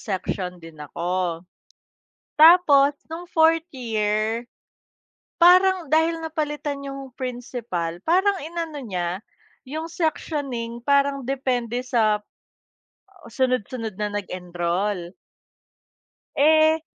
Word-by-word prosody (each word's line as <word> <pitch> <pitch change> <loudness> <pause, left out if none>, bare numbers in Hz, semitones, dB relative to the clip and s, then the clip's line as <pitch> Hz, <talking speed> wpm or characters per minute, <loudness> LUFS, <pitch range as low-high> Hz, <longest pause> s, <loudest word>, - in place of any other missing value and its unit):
section 185 -2 -4
din 165 -2 -13
ako 175 +2 -3 0.9
tapos 300 -4 +7 0.2
no'ng 335 +2 -6
fourth 325 0 +4
year 220 -1 -1 1.0
parang 365 0 +6
dahil 320 +2 +2
napalitan 295 -3 -3
yung 275 -1 -7
principal, 235 -9 -4
parang 380 +4 +3
inano 330 -2 -5
niya 180 -2 -3 0.4
yung 310 +5 -5
sectioning 275 -8 -3
parang 280 0 +2
depende 250 -2 -1
sa 220 -5 +2 1.1
sunod-sunod 245 -3 -1
na 210 - 0
nag-enroll. 180 0 -3 1.3
Eh, 315 +2 +4
255 Hz, 85 wpm, -23 LUFS, 205-315 Hz, 1.3 s, tapos